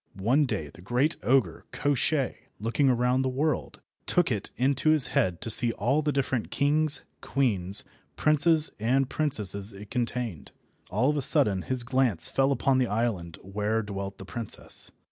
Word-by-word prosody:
One 130 +9 +2
day 75 - -4
the 85 - -15
great 125 - 0
ogre 115 - 0
Koshchei, 145 -1 0 0.2
looking 120 +6 +1
around 125 +1 +1
the 130 - -1
world, 145 +4 -2 0.3
took 175 -6 +1
it 105 -3 -2
into 140 +4 +1
his 150 -5 +6
head 90 -2 0
to 115 - -3
see 115 +1 +6
all 130 +9 0
the 150 0 -1
different 135 -4 -2
kings, 150 +1 +1 0.2
queens, 100 -8 +1 0.3
princes, 155 +1 +3
and 130 +5 +1
princesses 105 - -2
it 100 +1 -12
contained. 120 - -4 0.4
All 115 +10 +1
of 150 - -3
a - - 0
sudden 100 -6 +3
his 130 +4 +1
glance 120 -9 +2
fell 135 +1 +1
upon 135 0 +1
the 125 - +1
island 105 -7 -3
where 105 +3 -2
dwelt 100 -1 -6
the 95 - -10
princess. 110 +3 -1
125 Hz, 165 wpm, -26 LUFS, 100-140 Hz, 0.4 s, his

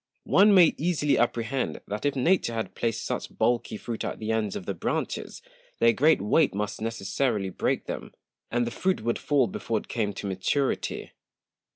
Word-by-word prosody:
One 205 +1 +6
may 175 -4 +7
easily 150 -3 +1
apprehend, 120 +2 0
that 105 +6 -5
if 145 - -1
Nature 135 -3 +2
had 110 - -3
placed 115 -1 -2
such - - -4
bulky 120 -2 +1
Fruit 115 +1 -5
at - - -3
the 110 0 -3
Ends 110 -3 -1
of 90 - -5
the - - -2
Branches, - - -3 0.3
their 115 0 +4
great 155 +7 +4
Weight 135 +4 +3
must 105 +1 -3
necessarily 110 -1 -1
break - - -1
them, - - -6 0.4
and 120 0 +1
the 120 - -3
Fruit 185 +5 0
would 120 +1 0
fall 145 -4 +2
before 115 0 -2
it - - -6
came 110 -4 -1
to 100 - -7
Maturity. 100 +9 -1
115 Hz, 180 wpm, -27 LUFS, 110-140 Hz, 0.4 s, may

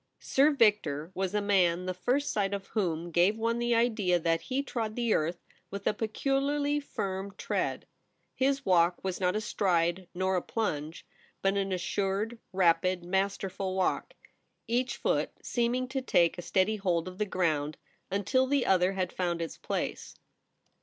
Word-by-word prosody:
IR 285 +3 +6
VICTOR 185 - +2
was 190 +1 -2
a 210 - +2
man 180 -3 +2
the 185 - -2
first 250 +10 0
sight 200 -1 0
of 195 -1 -6
whom 175 -5 -1
gave 180 +6 +3
one 230 +1 0
the 240 0 +2
idea 215 -6 +2
that 165 -1 +1
he 265 +2 -2
trod 225 -5 -3
the 235 -3 +1
earth 170 +3 -1 0.2
with 200 0 -6
a - - +3
peculiarly 280 +6 0
firm 195 -7 -4
tread. - - -2 0.5
His 275 +1 0
walk 175 -1 +3
was 190 -2 -2
not 180 0 +1
a 215 - 0
stride 175 -3 0
nor 185 +1 +1
a - - 0
plunge, 160 -8 -3 0.4
but 195 0 +2
an 195 -1 0
assured, 195 +5 -1
rapid, 185 0 +2
masterful 190 0 -1
walk, 190 -1 -1 0.5
each 245 +3 0
foot - - 0
seeming 245 +1 0
to 265 0 -2
take 170 -9 +3
a 175 - -6
steady 190 +4 +1
hold 180 -4 0
of 185 +1 -9
the 210 - +1
ground 155 -5 0 0.3
until 230 +7 +1
the 280 -1 +2
other 185 0 +3
had 185 -2 -2
found 175 -2 -1
its 165 -1 -4
place. - - -4
195 Hz, 165 wpm, -29 LUFS, 180-230 Hz, 0.5 s, IR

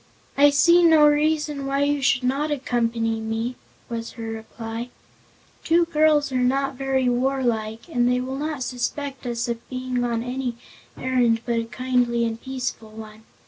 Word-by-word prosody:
"I 285 +1 +6
see 340 +5 +5
no 320 -3 +6
reason 295 -1 +1
why 275 +1 +1
you 290 0 +1
should 270 -2 +2
not 275 +4 0
accompany 230 -5 -1
me," 225 +3 -3 0.3
was 230 -1 -5
her 230 - -8
reply. 225 +1 -6 0.7
"Two 335 +1 +3
girls 305 -3 +3
are 255 - 0
not 270 +2 +1
very 265 -1 0
warlike 240 -3 -1
and 245 -7 +1
they 250 - +2
will 260 +1 -4
not 300 -3 -3
suspect 265 +2 -4
us 235 0 -2
of 235 -1 -5
being 255 -1 -2
on 235 -1 -1
any 250 -1 -3 0.4
errand 245 -3 +1
but 235 -1 0
a 230 - -3
kindly 245 -1 0
and 230 0 -4
peaceful 255 -4 -5
one. 215 0 -11
255 Hz, 160 wpm, -23 LUFS, 235-280 Hz, 0.7 s, I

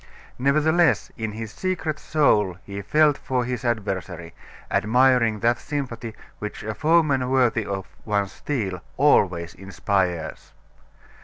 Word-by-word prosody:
Nevertheless 155 - +2
in 110 -2 -4
his 110 0 -6
secret 160 -4 -3
soul 105 - +2
he 100 0 -6
felt 150 +7 +3
for 125 -2 -1
his 125 -1 -4
adversary, 95 -7 -3 0.4
admiring 115 0 +3
that 120 +1 +2
sympathy 125 -6 -5 0.2
which 105 - -6
a 110 - -3
"foeman 150 -1 +2
worthy 120 -5 +2
of 95 -1 -3 0.2
one's 100 -2 -1
steel" 100 -11 -3 0.2
always 90 - +3
inspires. 95 -3 -2
115 Hz, 115 wpm, -24 LUFS, 100-140 Hz, 0.4 s, felt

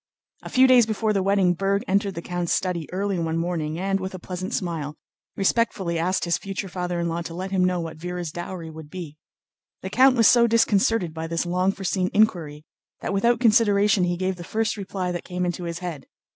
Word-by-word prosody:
A - - -8
few 260 +1 +5
days 250 -3 +6
before 220 0 0
the 195 - +1
wedding 195 -2 +3
Berg 195 +3 0
entered 200 0 +1
the 170 - -5
count's 175 -1 -3
study 175 -4 -1
early 195 0 -1
one 165 -1 -1
morning 165 -2 -2
and, 195 +2 0
with 190 0 -5
a - - -5
pleasant 185 +3 -5
smile, 165 -8 -3 0.4
respectfully 195 -4 0
asked 180 +3 0
his 170 - 0
future 195 0 -5
father 180 -1 -3
in 170 - -1
law 170 +1 -2
to 165 0 -7
let 190 +2 -5
him 190 -2 +2
know 180 -1 +1
what 165 -1 -6
Véra's 175 -1 -4
dowry 175 -1 -6
would 155 -1 -10
be. 165 -4 -7 0.7
The 190 - -5
count 260 +3 +5
was 230 - +6
so 235 -1 +6
disconcerted 220 -5 +2
by 160 0 -5
this 165 +1 -1
long 180 +2 +1
foreseen 190 -1 -1
inquiry 160 -8 +1 0.4
that - - -3
without 235 +4 +2
consideration 210 -4 +4
he 175 0 -1
gave 185 0 -1
the 175 - -8
first 220 +4 -1
reply 190 -3 -3
that 175 - -4
came 180 0 -3
into 175 0 -3
his 170 0 -4
head. 160 -6 -6
185 Hz, 215 wpm, -24 LUFS, 170-200 Hz, 0.7 s, days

